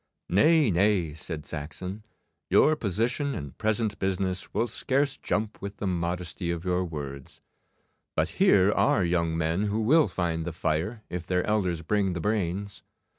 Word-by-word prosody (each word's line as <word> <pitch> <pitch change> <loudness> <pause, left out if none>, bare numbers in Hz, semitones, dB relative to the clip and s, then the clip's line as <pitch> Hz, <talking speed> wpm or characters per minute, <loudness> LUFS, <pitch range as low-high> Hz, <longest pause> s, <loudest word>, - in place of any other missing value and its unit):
'Nay, 150 - +4
nay,' 90 -3 +2
said 80 -1 -7
Saxon, 85 +7 -6 0.5
'your 155 - +5
position 125 - -1
and 70 -7 -6
present 110 -1 0
business 95 -1 -1
will 115 - +1
scarce 135 +4 0
jump 105 0 -2
with 100 +1 -6
the - - -4
modesty 90 -1 -2
of 85 +1 -3
your 90 0 +1
words. 70 -5 -7 0.8
But - - +1
here 100 0 +6
are 95 -2 +3
young 85 -1 0
men 85 +5 0
who 105 +2 0
will 150 +8 +5
find 85 -3 -2
the 85 0 -4
fire 85 +8 -2
if 90 -1 -4
their 90 -1 +1
elders 90 -6 0
bring 100 +1 +1
the 85 - -3
brains. 100 0 -2
95 Hz, 155 wpm, -27 LUFS, 85-105 Hz, 0.8 s, here